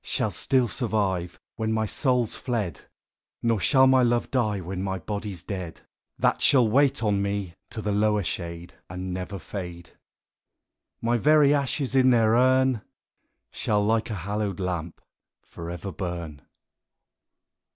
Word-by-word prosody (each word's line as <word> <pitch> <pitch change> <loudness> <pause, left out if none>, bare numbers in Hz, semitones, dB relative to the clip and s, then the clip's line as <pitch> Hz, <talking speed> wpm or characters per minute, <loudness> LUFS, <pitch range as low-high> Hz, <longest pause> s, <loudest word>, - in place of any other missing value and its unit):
Shall - - -1
still 130 -2 +1
survive 100 -7 -1 0.2
Wlien 110 0 0
my 110 0 +1
soul's 125 0 0
fled; 105 - -3 0.6
Nor 115 -2 +2
shall 130 +5 +5
my 130 0 +5
love 120 -1 +1
die, 110 -6 +1
when 95 +1 -5
ray 95 -1 -2
Ijody's 100 -1 -5
dead; 90 -5 -6 0.4
That - - +1
shall 125 -5 +5
wait 135 +2 +3
on 100 -2 +2
me 100 -3 -2 0.2
to 110 - -6
the 105 - -1
lower 105 0 +2
shade, 85 0 -5 0.2
And 90 0 -5
never 95 +2 -5
fade: 85 -1 -7 1.1
My 120 +1 +2
very 150 +1 +5
ashes 140 -1 -1
in 130 -1 +5
their 115 -3 +4
urn 130 -1 +3 0.7
Shall, 105 -1 0
like 110 +2 +1
a 110 - -3
hallowed 100 +1 -3
lamp, 90 -3 -3 0.4
for 85 0 -8
ever 90 +3 -5
burn. 85 -6 -5
105 Hz, 140 wpm, -26 LUFS, 90-120 Hz, 1.1 s, shall